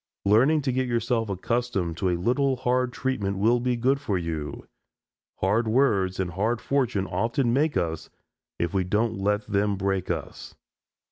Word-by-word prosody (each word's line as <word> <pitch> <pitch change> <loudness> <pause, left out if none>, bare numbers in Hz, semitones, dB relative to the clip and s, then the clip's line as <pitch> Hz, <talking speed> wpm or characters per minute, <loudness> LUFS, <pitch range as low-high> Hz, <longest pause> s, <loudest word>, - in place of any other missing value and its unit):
Learning 130 +10 +4
to 130 - 0
get 130 0 0
yourself 115 -1 0
accustomed 100 -3 -1
to 95 +2 0
a 90 - 0
little 130 +8 +1
hard 125 0 0
treatment 115 -8 -2
will 115 +5 +3
be 125 0 0
good 130 +4 +1
for 100 -9 -1
you. 80 -4 -4 0.8
Hard 105 +5 +2
words 105 -7 +2
and 90 -2 -1
hard 110 +6 0
fortune 125 -8 0
often 115 +7 0
make 145 +3 +2
us 80 -2 -2 0.5
if 85 +1 -2
we 95 -1 +1
don't 110 +4 0
let 105 +2 0
them 100 0 0
break 95 -1 -1
us. 80 -4 -5
110 Hz, 160 wpm, -26 LUFS, 95-125 Hz, 0.8 s, Learning